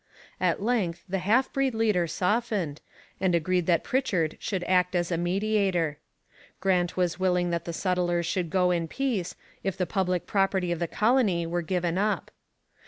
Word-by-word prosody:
At - - +1
length 210 -8 0
the 190 +1 -1
half 220 +8 +2
breed 270 -3 +1
leader 210 -6 +2
softened, 185 -3 -1 0.4
and 185 -2 +2
agreed 175 +1 +1
that 170 -3 +3
Pritchard 185 - 0
should 190 -4 -3
act 180 0 +2
as 175 0 0
a - - +2
mediator. 180 -4 0 0.6
Grant 180 -2 +1
was 180 -1 0
willing 180 -1 +1
that 170 -1 -2
the 170 - -3
settlers 175 -1 0
should 175 0 -1
go 180 +1 +2
in 170 -2 0
peace, 235 -6 -2 0.3
if 190 -1 -2
the 185 - 0
public 180 -1 -1
property 195 -3 +1
of 170 - -1
the 170 - -1
colony 215 -5 +2
were 175 +1 -1
given 175 0 -1
up. 210 +1 -1
180 Hz, 170 wpm, -27 LUFS, 175-200 Hz, 0.6 s, that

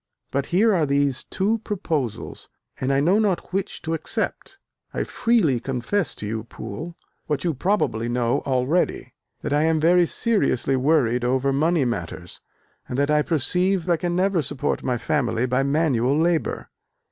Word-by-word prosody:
But 140 0 -1
here 210 +5 +3
are 165 -5 +2
these 140 -1 +1
two 210 +4 0
proposals, 165 - -4 0.3
and 130 +1 0
I 135 - +3
know 180 +9 +3
not 195 -4 -1
which 195 0 -3
to 165 - -2
accept. 165 - -3 0.4
I - - 0
freely 210 - +1
confess 135 - -1
to - - -7
you, 110 +1 -3
Poole, 135 +10 -7 0.3
what 145 -2 -1
you 170 - 0
probably 130 - 0
know 120 0 +1
already, 135 +6 0 0.3
that - - -1
I 145 - +3
am 160 0 +2
very 175 +2 +4
seriously 200 - +1
worried 130 -3 +2
over 130 +2 +1
money 155 +1 +2
matters, 90 -6 -5 0.5
and 125 - -3
that 140 +1 +1
I 150 0 +4
perceive 180 +4 +1
I 175 - +4
can 175 +2 -2
never 185 -1 +2
support 140 0 0
my 125 -2 -1
family 120 -1 0
by 125 +1 +1
manual 140 -2 +1
labour. 165 0 0
150 Hz, 160 wpm, -23 LUFS, 125-175 Hz, 0.5 s, very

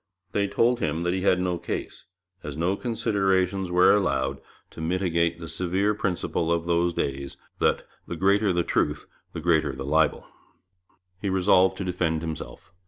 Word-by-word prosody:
They 100 0 +1
told 120 +4 +2
him 80 +1 -1
that 85 0 0
he 95 - -1
had 90 -1 +3
no 90 -1 -1
case, - - -5 0.4
as 75 -1 -7
no 90 +4 +1
considerations 95 -5 0
were 90 +1 +5
allowed 70 -9 0 0.3
to - - -9
mitigate 85 -1 0
the 80 - -7
severe 95 +5 0
principle 90 -4 -1
of 85 0 0
those 85 0 +2
days, 70 -4 -3 0.2
that - - +2 0.2
'the 85 - -4
greater 100 +3 +3
the 85 -1 +1
truth 75 -2 0 0.3
the - - -4
greater 80 -4 +2
the 65 0 -6
libel.' 80 +1 +1 1.0
He 100 - -1
resolved 95 0 +3
to - - -3
defend 85 -3 -1
himself. 80 -1 -7
90 Hz, 165 wpm, -25 LUFS, 80-95 Hz, 1.0 s, were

